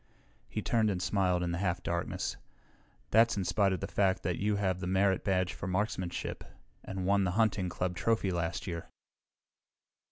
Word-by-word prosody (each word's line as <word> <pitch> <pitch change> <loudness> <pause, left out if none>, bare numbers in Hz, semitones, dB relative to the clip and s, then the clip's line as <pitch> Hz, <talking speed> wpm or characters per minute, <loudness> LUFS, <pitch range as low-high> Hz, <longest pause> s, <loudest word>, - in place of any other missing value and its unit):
He - - -3
turned 110 -2 +2
and 95 -3 -1
smiled 90 -1 +1
in 85 - -1
the 85 - -2
half 90 -3 -1
darkness. - - -2 0.8
"That's 115 0 +5
in 95 - -1
spite 100 +1 +2
of 95 -4 -2
the - - -2
fact 95 -2 +1
that 85 0 -1
you 105 +1 +1
have 95 -3 0
the 90 - -3
merit 95 +1 +2
badge 95 -2 +1
for 90 - -6
marksmanship 95 -2 -2 0.4
and 95 -1 -4
won 100 +1 +3
the 90 - +1
hunting 105 -5 +2
club 90 +1 -2
trophy 110 -2 +1
last 85 -1 -2
year." 85 -3 -5
95 Hz, 180 wpm, -31 LUFS, 90-100 Hz, 0.8 s, That's